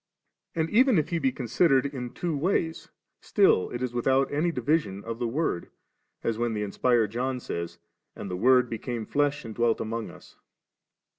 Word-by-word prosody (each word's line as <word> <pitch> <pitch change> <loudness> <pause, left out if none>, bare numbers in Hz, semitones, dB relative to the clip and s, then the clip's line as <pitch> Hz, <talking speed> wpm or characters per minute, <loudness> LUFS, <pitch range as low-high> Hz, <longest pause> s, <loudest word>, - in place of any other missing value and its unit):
And 160 -1 +1
even 250 0 +5
if 155 - +1
He 170 - 0
be 135 -3 +1
considered 130 +3 +2
in 130 -3 -4
two 170 -3 -2
ways', 165 +1 -1 0.3
still 90 - +3
it 120 +1 -4
is 125 -1 -2
without 130 +3 +1
any 160 +4 +1
division 125 -8 0
of 115 0 -5
the 120 - 0
Word, 120 - -2 0.5
as 115 -1 -1
when 120 -1 0
the 105 - -1
inspired 110 +1 +1
John 125 +2 -2
says, 85 -7 -5 0.4
*And - - -7
the 90 - -3
Word 125 +5 +4
became 115 0 -4
flesh, 145 0 0
and 110 - -6
dwelt 115 0 +1
among 115 0 -3
us - - -14
3.' - - -35
125 Hz, 180 wpm, -27 LUFS, 115-145 Hz, 0.5 s, even